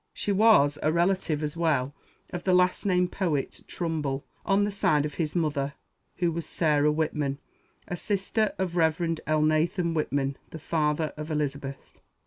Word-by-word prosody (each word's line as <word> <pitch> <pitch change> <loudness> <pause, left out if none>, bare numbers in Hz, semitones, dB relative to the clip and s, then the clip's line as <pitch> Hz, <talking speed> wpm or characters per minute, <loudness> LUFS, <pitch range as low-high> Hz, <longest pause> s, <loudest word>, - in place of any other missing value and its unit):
She 205 - -1
was 190 -9 +5
a 155 - +2
relative 170 -3 +1
as 150 +1 -3
well 145 -5 +1 0.4
of 175 0 -5
the 185 -1 +3
last 180 +2 +2
named 180 -1 +2
poet, 160 -8 -2
Trumbull, 150 -5 -3 0.2
on 200 +1 +2
the 205 - 0
side 150 -7 +2
of 150 - -4
his 155 -2 -2
mother, 145 -4 -1 0.4
who 175 -2 +1
was 165 0 -4
Sarah 150 -2 +2
Whitman, 150 -3 -1 0.5
a 180 - -3
sister 205 +3 -1
of 180 -2 -2
Rev. 160 -2 +3 0.3
Elnathan 155 +3 +2
Whitman, 140 -3 -1
the - - -8
father 155 0 0
of 155 +1 -6
Elizabeth. 140 -3 -4
160 Hz, 155 wpm, -27 LUFS, 150-180 Hz, 0.5 s, was